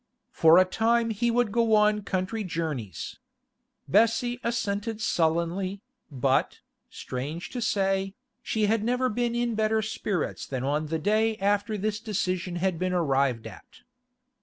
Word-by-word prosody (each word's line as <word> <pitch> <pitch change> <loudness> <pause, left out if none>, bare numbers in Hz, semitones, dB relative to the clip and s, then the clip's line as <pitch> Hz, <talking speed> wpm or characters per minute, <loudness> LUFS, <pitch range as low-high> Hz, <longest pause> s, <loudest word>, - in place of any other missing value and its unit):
For 165 +1 +6
a 185 - +7
time 230 +4 +1
he 235 +3 0
would 235 -2 +1
go 230 0 +3
on 210 0 +3
country 195 +3 -2
journeys. 160 - -4 0.7
Bessie 240 +2 +2
assented 220 -2 -2
sullenly, 180 +1 0 0.3
but, 135 -2 0 0.3
strange 150 +7 -6
to 245 - -4
say, 195 -2 0 0.3
she 215 -1 0
had 215 +1 +1
never 250 +2 +1
been 235 +1 -1
in 240 -1 0
better 220 0 +1
spirits 205 -4 -3
than 130 -2 -3
on 150 +3 -1
the 160 +2 -1
day 215 +6 +1
after 205 +2 0
this 210 +2 -2
decision 185 -5 -2
had 180 -1 -1
been 185 0 -1
arrived 135 -8 +1
at. 100 -7 -12
200 Hz, 140 wpm, -27 LUFS, 170-225 Hz, 0.7 s, a